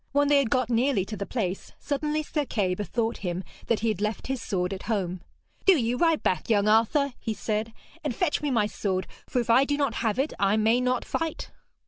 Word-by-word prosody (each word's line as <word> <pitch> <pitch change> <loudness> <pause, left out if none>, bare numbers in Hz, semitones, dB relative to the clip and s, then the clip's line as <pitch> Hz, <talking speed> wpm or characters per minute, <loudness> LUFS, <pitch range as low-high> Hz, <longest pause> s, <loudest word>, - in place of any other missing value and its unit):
When 285 0 +3
they 290 -1 +6
had 270 -5 +1
got 250 0 +1
nearly 235 -4 +2
to 215 - -6
the 200 - -5
place, 195 -6 -3
suddenly 300 +1 -1
Sir 300 0 -1
Kay 200 -9 0
bethought 225 +4 -2
him 180 -1 -3 0.2
that 230 -3 +1
he 230 - +1
had 210 -3 -2
left 210 0 -2
his 265 -2 -3
sword 180 -2 -1
at 190 - -6
home. 185 -5 -1 0.4
'Do 390 - +8
you 235 -2 0
ride 330 +3 +2
back, 185 - 0
young 205 -2 +3
Arthur,' 230 +6 +3
he 220 - -3
said, 215 +2 -2 0.3
'and - - -2
fetch 360 -6 0
me 295 - -1
my 230 -6 +2
sword, 190 -3 -2 0.2
for 250 - 0
if 235 -1 +1
I 255 +4 +6
do 285 +1 0
not 280 -5 +1
have 220 -1 0
it 275 +4 0
I 200 +2 +3
may 225 +3 +3
not 250 0 0
fight.' 325 -1 -3
230 Hz, 225 wpm, -27 LUFS, 205-275 Hz, 0.4 s, Do